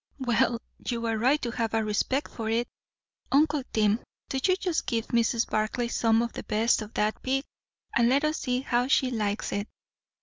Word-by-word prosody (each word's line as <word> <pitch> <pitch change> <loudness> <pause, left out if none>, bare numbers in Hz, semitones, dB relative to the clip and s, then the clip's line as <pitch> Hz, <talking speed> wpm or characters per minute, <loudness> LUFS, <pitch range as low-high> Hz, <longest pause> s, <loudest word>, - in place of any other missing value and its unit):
"Well, 240 -2 +1 0.3
you're 230 -2 -1
right 265 +6 +3
to 240 - -1
have 225 -2 -1
a 225 - +2
respect 215 +6 -1
for 220 -2 -4
it. 235 +2 +1 0.6
Uncle 295 +1 +3
Tim, 215 0 +2 0.3
do 265 - -1
you 370 - +4
just 360 -3 -2
give 230 -1 0
Mrs. 235 0 +2
Barclay 215 +3 -1
some 225 -1 +2
of 235 - -4
the - - -5
best 225 +2 +1
of 215 0 -7
that 210 +1 0
pig, 270 +1 0 0.5
and 235 0 +4
let 275 +3 +3
us 305 +1 0
see 250 -1 -1
how 245 -1 +1
she 260 -1 +3
likes 210 -3 -1
it. 205 +1 -2
235 Hz, 190 wpm, -27 LUFS, 220-260 Hz, 0.6 s, you